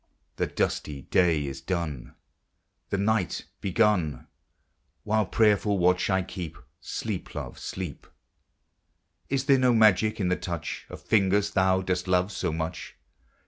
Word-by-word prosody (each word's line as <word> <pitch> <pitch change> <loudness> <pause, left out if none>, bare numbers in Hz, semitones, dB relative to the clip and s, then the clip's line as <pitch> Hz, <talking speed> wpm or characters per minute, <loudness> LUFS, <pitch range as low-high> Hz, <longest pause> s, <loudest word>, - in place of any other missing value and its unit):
'The - - 0
dusty 70 -3 -2
day 85 -5 +2
is 70 -1 -6
done, 85 -8 -4 0.7
The 100 - 0
night 100 -2 0
begun; 95 -6 +1 0.8
While 110 -1 +1
prayerful 105 -2 +3
watch 90 +1 +2
I 95 -1 +2
keep, 90 -3 -7 0.2
Sleep, - - -5
love, - - -6
sleep! 90 -7 -6 1.2
Is 135 -1 0
there 135 -1 +5
no 125 -1 +4
magic 110 0 +4
in 95 -3 +1
the 90 - +2
touch 85 -3 -5
Of - - -9
fingers 100 -1 +2
thou 95 -1 +3
dost 90 0 -1
love 90 +2 +2
so 90 -3 -2
much 80 +1 -4
95 Hz, 135 wpm, -27 LUFS, 85-105 Hz, 1.2 s, there